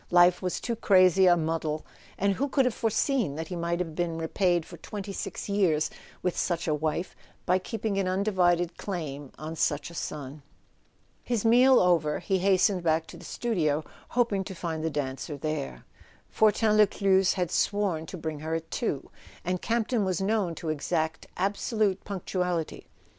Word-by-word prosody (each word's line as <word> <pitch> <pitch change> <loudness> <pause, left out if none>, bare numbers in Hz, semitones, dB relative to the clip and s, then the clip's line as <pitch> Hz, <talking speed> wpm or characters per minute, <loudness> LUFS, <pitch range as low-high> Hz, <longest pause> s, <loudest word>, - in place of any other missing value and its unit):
Life 175 0 +5
was 180 -1 -2
too 235 - -2
crazy 185 -3 +5
a 175 -1 +6
muddle—and 160 +4 -2
who 275 +8 -1
could 270 -1 +3
have 250 - +1
foreseen 225 - 0
that 160 +1 -5
he 180 - -4
might 170 0 -1
have 165 -3 -3
been 170 0 -2
repaid 175 +1 +1
for 170 - -11
twenty 200 +4 -6
six - - -5
years 180 -7 +2 0.3
wdth 180 - +1
such 170 -2 -1
a 155 - +2
wife 155 +4 -2 0.3
by 185 +1 +3
keeping 210 0 -2
an 190 - 0
undivided 180 -3 +1
claim 145 -8 -5
bn 155 +2 -6
such 150 +1 0
a - - -12
son? 145 -3 -6 0.8
His 235 -3 -1
meal 250 +3 +6
over, 165 -4 +3
he 190 -1 0
hastened 190 0 +3
back 160 -1 +1
to - - -10
the - - -13
studio, 160 -10 0 0.3
hop¬ 240 -2 +2
ing 195 -1 0
to 190 - -7
find 165 -2 -4
the 160 - +1
dancer 145 0 -4
there. 70 - -4 0.5
Fortin 215 0 +3
Lescluze 195 -2 +4
had 180 -3 -1
sworn 190 -7 0
to 185 - -7
bring 155 -2 -4
her 160 +2 -2
at 165 0 -5
two, 145 - -2 0.3
and 180 0 -1
Campton 230 0 0
was 185 -3 0
known 195 -3 0
to 160 - -5
exact 160 +1 -1
absolute 200 0 0
punctuality. 180 -4 -3
180 Hz, 170 wpm, -28 LUFS, 160-200 Hz, 0.8 s, a